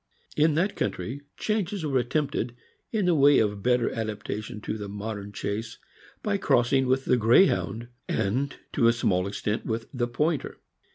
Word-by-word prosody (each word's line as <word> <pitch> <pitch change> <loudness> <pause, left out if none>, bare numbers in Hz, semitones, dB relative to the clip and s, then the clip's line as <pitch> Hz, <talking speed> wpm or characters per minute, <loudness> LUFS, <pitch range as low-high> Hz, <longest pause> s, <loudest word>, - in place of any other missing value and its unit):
In 155 0 +3
that 190 +6 +1
country, 135 +5 -3 0.2
changes 205 -4 -1
were 135 -3 +2
attempted, 125 -2 -1 0.4
in 215 -4 +1
the 180 - +4
way 145 -2 +6
of 105 -2 +1
better 125 +1 +2
adaptation 110 -1 -4
to 110 - -3
the 105 -2 -6
modern 100 0 -5
chase, 105 +2 -4 0.5
by 205 -1 +1
crossing 130 -6 +3
with 130 +1 +1
the 125 - +3
Greyhound, 115 - +3 0.2
and, 130 +8 0 0.2
to 120 -5 +4
a 115 - +5
small 95 -6 +1
extent, 105 +2 -2
with 115 0 -3
the 120 -2 0
Pointer. 150 +5 -1
120 Hz, 160 wpm, -27 LUFS, 105-145 Hz, 0.5 s, way